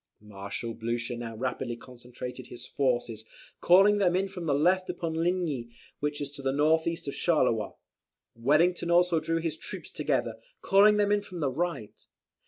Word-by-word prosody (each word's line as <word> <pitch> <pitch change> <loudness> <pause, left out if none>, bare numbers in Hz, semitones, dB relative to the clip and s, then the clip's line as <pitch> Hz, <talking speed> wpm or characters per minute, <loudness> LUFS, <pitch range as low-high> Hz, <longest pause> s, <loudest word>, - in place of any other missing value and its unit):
Marshal 105 +2 -6
Blucher 115 +2 -3
now 115 -1 -6
rapidly 125 0 -3
concentrated 125 0 -9
his 120 - -10
forces, 120 -5 -1 0.4
calling 195 +4 +5
them 180 -3 +3
in 195 +1 +1
from 180 -3 -7
the 140 - +2
left 185 +5 +2
upon 170 -2 -3
Ligny, 165 -7 -1 0.3
which 145 0 -2
is 145 -1 -4
to 145 -1 -10
the 135 0 0
north 155 +4 +2
east 165 -1 -3
of 140 - -3
Charleroi. 130 -10 +1 0.6
Wellington 160 +9 +2
also 175 -1 +4
drew 165 +1 -1
his 165 -1 -2
troops - - -7
together, - - -1 0.3
calling 205 +2 +5
them 205 -1 +2
in 205 0 +3
from 185 -3 -9
the 140 -4 0
right. 165 -6 -4
150 Hz, 170 wpm, -28 LUFS, 120-175 Hz, 0.6 s, calling